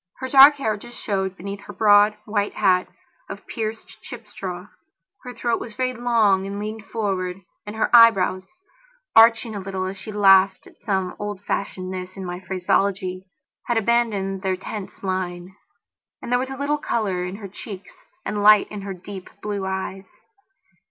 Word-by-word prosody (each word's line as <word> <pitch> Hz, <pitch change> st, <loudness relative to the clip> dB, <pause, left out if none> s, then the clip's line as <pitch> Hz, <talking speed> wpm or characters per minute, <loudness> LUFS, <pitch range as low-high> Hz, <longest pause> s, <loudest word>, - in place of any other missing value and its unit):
Her 260 Hz, -, -5 dB
dark 275 Hz, +2 st, +9 dB
hair 220 Hz, -7 st, -1 dB
just 240 Hz, +3 st, -12 dB
showed 190 Hz, -2 st, -2 dB
beneath 200 Hz, +2 st, -6 dB
her 205 Hz, -, -9 dB
broad, 205 Hz, +1 st, +5 dB
white 205 Hz, -1 st, -1 dB
hat 185 Hz, -3 st, +2 dB, 0.4 s
of -, -, -8 dB
pierced, 220 Hz, -1 st, -6 dB
chip -, -, -10 dB
straw; -, -, -7 dB, 0.5 s
her 250 Hz, -, -8 dB
throat 240 Hz, -1 st, -1 dB
was 220 Hz, -2 st, -8 dB
very 255 Hz, +1 st, -1 dB
long 225 Hz, -6 st, +2 dB
and 200 Hz, +1 st, -5 dB
leaned 215 Hz, +1 st, -6 dB
forward, 190 Hz, -4 st, -3 dB, 0.3 s
and 210 Hz, -, -6 dB
her 220 Hz, -, +1 dB
eyebrows, 195 Hz, -5 st, +5 dB, 0.7 s
arching 225 Hz, 0 st, +6 dB
a 205 Hz, -, -4 dB
little 190 Hz, -1 st, -4 dB
as 190 Hz, +1 st, -6 dB
she 215 Hz, -, -8 dB
laughed 195 Hz, -2 st, +4 dB
at -, -, -19 dB
some 190 Hz, -3 st, -1 dB
old 205 Hz, -1 st, -4 dB
fashionedness 185 Hz, -1 st, -4 dB
in 190 Hz, -, -6 dB
my 180 Hz, 0 st, -5 dB
phraseology, 185 Hz, 0 st, -1 dB, 0.4 s
had 240 Hz, -, +1 dB
abandoned 215 Hz, -4 st, 0 dB
their 190 Hz, -1 st, -1 dB
tense 200 Hz, +2 st, -8 dB
line. 185 Hz, -1 st, -4 dB, 0.6 s
And -, -, -8 dB
there 245 Hz, -, +3 dB
was 260 Hz, +1 st, -3 dB
a 270 Hz, -, -6 dB
little 290 Hz, +2 st, -1 dB
colour 200 Hz, -9 st, -1 dB
in 180 Hz, +1 st, -5 dB
her 200 Hz, -1 st, -8 dB
cheeks 195 Hz, 0 st, -10 dB, 0.3 s
and 210 Hz, -, -2 dB
light 210 Hz, 0 st, +6 dB
in 210 Hz, -1 st, -6 dB
her 195 Hz, -1 st, -6 dB
deep 190 Hz, +1 st, -10 dB
blue 205 Hz, -2 st, -3 dB
eyes. 190 Hz, 0 st, -4 dB
200 Hz, 170 wpm, -22 LUFS, 190-220 Hz, 0.7 s, dark